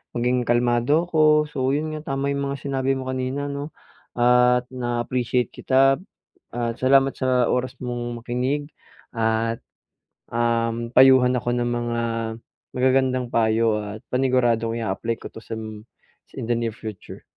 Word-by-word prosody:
maging 125 0 0
kalmado 120 +6 +2
ako. 155 -3 +3
So 130 -1 0
yun 155 +1 -2
nga, 155 -3 -4
tama 140 +1 -1
yung 140 0 -2
mga 140 -1 -5
sinabi 135 -1 0
mo 130 0 -4
kanina, 130 +2 -3
'no 140 +2 -6 0.4
at 125 0 +4
na-appreciate 120 -1 -1
kita. 135 +1 +3 0.5
At 120 -1 -2
salamat 135 +1 +4
sa 130 -2 +1
oras 125 +1 -2
mong 120 -1 -4
makinig 130 +5 -2 0.4
at 115 0 0 0.7
um, 115 0 -1
payuhan 130 -1 +6
ako 120 -1 -1
ng 120 - 0
mga 120 -1 -2 0.8
magagandang 130 -1 +2
payo 110 -1 +2
at 105 +1 -8
paniguradong 120 -3 +1
i-a-apply 115 +1 -2
ko - - -10
to 115 - -10
sam 110 -2 -7 0.5
sa - - -17
in - - -4
the 120 - +1
near 115 0 -1
future. 110 -3 -9
125 Hz, 140 wpm, -23 LUFS, 115-135 Hz, 0.8 s, payuhan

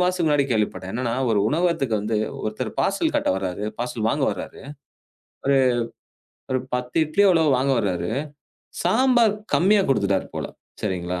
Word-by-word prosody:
மாசத்துக்கு 180 -2 +1
முன்னாடி 145 -2 +3
கேள்விப்பட்டேன். 100 -4 -1
என்னன்னா, 120 0 -2 0.2
ஒரு 105 - +2
உணவத்துக்கு 160 -7 +1
வந்து 110 +2 -1 0.3
ஒருத்தர் 110 0 -3
பார்சல் - - +1
கட்ட - - 0
வராரு. 95 +1 -3
பார்சல் 120 -2 -2
வாங்க 140 +3 +1
வராரு. - - -8 0.8
ஒரு 140 0 +4 1.0
ஒரு 130 - +2 0.2
10 125 +2 -4
இட்லி 155 +7 +2
அளவு 160 -3 +3
வாங்க 135 +2 +1
வராரு. 90 -2 -2 0.7
சாம்பார் 240 -3 +3 0.2
கம்மியா 200 +3 +4
குடுத்துட்டாரு 100 -7 +1
போல. - - -3 0.4
சரிங்களா? 90 -3 -2
125 Hz, 140 wpm, -23 LUFS, 105-165 Hz, 1.0 s, ஒரு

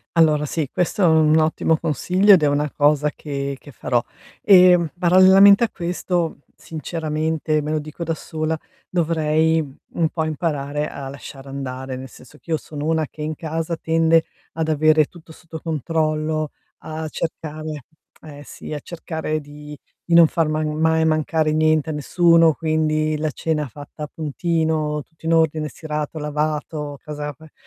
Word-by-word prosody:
Allora, 155 -2 +4
sì, 155 0 -2
questo 180 +3 0
è - - +6
un 160 -1 +4
ottimo 160 0 +2
consiglio 180 +6 +3
ed 185 - +6
è 150 - +3
una 145 +1 0
cosa 150 0 +3
che 140 -2 -4
che 145 - -14
farò, 120 -1 -1 0.4
ehm, 180 -4 +6
parallelamente 190 +4 +7
a - - -5
questo, 175 -2 -2 0.2
sinceramente 155 0 -2
me 150 - -5
lo 155 - 0
dico 155 +3 -7
da 165 -1 -2
sola, 160 +1 -3 0.3
dovrei 160 -1 +1 0.3
un 165 -2 +1
po' 160 - -2
imparare 150 -2 -2
a 135 -1 -7
lasciar 135 0 -10
andare, 130 -1 -6
nel 130 +1 -8
senso 130 +5 -16
che - - -21
io 160 - +2
sono 150 -1 -7
una 160 -1 +1
che 155 - -12
in 155 +1 -3
casa 165 +2 -3
tende 165 0 +2 0.3
ad 160 -1 -2
avere 155 0 +4
tutto 160 +1 -16
sotto 160 0 -10
controllo, 155 -1 -1 0.3
a 155 0 -6
cercare 155 -2 -5 0.4
eh, 145 -2 -11
sì, 150 - -9
a 150 - -3
cercare 160 -1 -4
di 150 0 -11 0.3
di 170 - +1
non 170 -1 +9
far 165 0 0
ma 155 0 -1
mhmm, 150 - -2
mai 160 0 +3
mancare 155 0 +1
niente 155 0 +2
a - - -3
nessuno, 165 +2 +4
quindi 155 -1 0
la 155 0 -1
cena 150 0 -2
fatta 145 +5 -10
a 150 - -5
puntino, 155 -1 -1
tutto 160 +2 -20
in 165 - +3
ordine, 160 -1 +1
stirato, 150 +1 -5
lavato, 150 -1 -3
casa 150 -1 -5
pe 155 +3 -17
155 Hz, 165 wpm, -21 LUFS, 150-165 Hz, 0.4 s, non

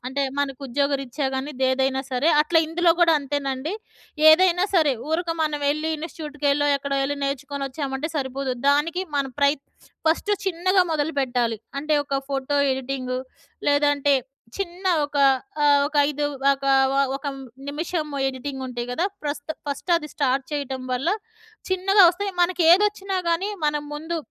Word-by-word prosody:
అంటే 275 +2 -1 0.2
మనకు 280 -2 -2
ఉద్యోగరీత్యా 275 +1 -1
కాని, 270 +3 -3 0.2
ఏదైనా 265 0 +1
సరే. 255 +5 +1
అట్లా 325 +2 +3
ఇందులో 335 +2 +2
కూడా 335 -1 +6
అంతేనండి. 280 +2 -3 0.6
ఏదైనా 360 +2 +5
సరే 310 -5 +4 0.2
ఊరక 335 +1 0
మనం 300 -2 -1
యేళ్ళి 305 +2 0
ఇన్సిట్యూట్‍కెళ్ళో 295 -2 -1
ఎక్కడో 275 0 -3
యేళ్ళి 285 +1 -1
నేర్చుకొని 275 0 -3
వచ్చామంటే 275 +2 -4
సరిపోదు. 270 -1 -2 0.2
దానికి 310 +6 +2
మనం 275 -1 -1
ప్రయత్ 280 0 +2 0.4
ఫస్ట్ 335 +6 +2
చిన్నగా 370 +1 +2
మొదలుపెట్టాలి. 260 -7 0 0.2
అంటే 305 +1 0
ఒక 275 -1 -1
ఫోటో 275 +1 -1
ఎడిటింగు. 255 -1 -3 0.5
లేదంటే 285 -1 +3 0.4
చిన్న 375 -1 -5 0.2
ఒక 290 - -7 0.5
ఆహ్, 285 -1 +5
ఒక 305 - -8
5 295 0 -2 0.3
ఒక 275 0 -6 0.5
ఒక 275 - -9 0.4
నిమిషం 315 +2 -3 0.2
ఎడిటింగ్ 265 +1 -6
ఉంటయి 245 -1 -5
కదా. 330 +8 0 0.2
ప్రస్త్ 290 +1 -4 0.2
ఫస్ట్ 285 +5 -4
అది 300 -2 -5
స్టార్ట్ 270 -1 0
చేయటం 275 -3 -3
వల్ల 260 +6 -1 0.6
చిన్నగా 385 +2 +4
వస్తాయి. 395 +3 -2
మనకు 350 0 +2
ఏదొచ్చినా 395 0 +2
కానీ 360 +5 0 0.2
మనం 295 0 0
ముందు 320 +3 -4
290 Hz, 140 wpm, -23 LUFS, 275-330 Hz, 0.6 s, కూడా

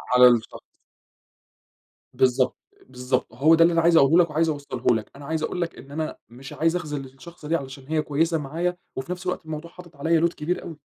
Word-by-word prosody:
على 125 0 +9
الشخص. 120 -2 +1 1.5
بالضبط، 130 0 +2 0.3
بالضبط، 125 0 -2
هو 150 +7 +5
ده 165 - +6
اللي 170 - +4
أنا 165 - +3
عايز 170 0 +5
أقوله 165 +5 +6
لَك 170 - -5
وعايز 160 +2 +1
أوصله 140 -5 0
لَك 110 - -5
أنا 140 0 -11
عايز 160 +1 -2
أقول 180 - -2
لَك 170 - -3
إن 140 - -13
أنا 155 +1 -4
مش 130 +4 -11
عايز 165 +2 +1
أخذل 150 -6 -4
الشخصة 150 +5 -12
دي 165 - +1
علشان 135 -3 -6
هي 155 0 +1
كويسة 160 +3 0
معايا، 165 +5 -2 0.2
وفي 135 +6 -5
نفْس 180 +1 -5
الوقت 180 -2 -3
الموضوع 160 +2 -7
حاطط 175 -3 -14
عليّا 160 +3 +1
load 170 - -8
كبير 170 +4 -3
أوي 165 -4 -8
155 Hz, 210 wpm, -24 LUFS, 135-170 Hz, 1.5 s, على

